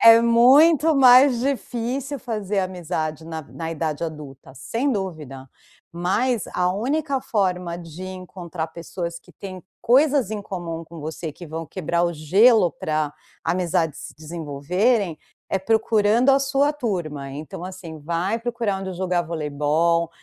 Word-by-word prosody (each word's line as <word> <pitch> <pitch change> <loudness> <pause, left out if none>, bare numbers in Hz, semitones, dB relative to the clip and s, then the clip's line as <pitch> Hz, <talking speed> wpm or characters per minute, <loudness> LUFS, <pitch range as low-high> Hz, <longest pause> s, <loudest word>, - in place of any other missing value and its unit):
É 230 0 +9
muito 280 +7 +6
mais 255 -1 +7
difícil 260 +1 -2
fazer 210 -5 -3
amizade 170 -4 -3
na 160 -1 -6
na 165 +3 -6
idade 160 0 -2
adulta, 145 -4 -9
sem 230 - -1
dúvida. 155 - -5 0.4
Mas, 195 +7 0
a 180 0 +2
única 275 +7 -1
forma 180 -7 -1
de 170 +1 -9
encontrar 180 -3 -6
pessoas 170 +1 -6
que - - -20
têm 185 -2 -8 0.2
coisas 270 -2 +4
em 215 -1 -3
comum 170 -4 -5
com 165 0 -11
você, 155 +1 -5
que 175 - -11
vão 160 +1 -5
quebrar 170 +1 -1
o 170 - 0
gelo 185 +6 +4
para 155 -2 -2 0.3
amizades 170 -3 0
se 165 - -9
desenvolverem, 165 - -1 0.3
é 195 - 0
procurando 220 +3 +2
a 270 - +5
sua 275 +1 +2
turma. 170 - -3
Então 150 +4 -7
assim, 180 -4 -8
vai 170 +8 -1
procurar 230 -4 -2
onde 190 -1 -5
jogar 180 -1 0
voleibol, 160 +1 0
180 Hz, 140 wpm, -23 LUFS, 160-230 Hz, 0.4 s, É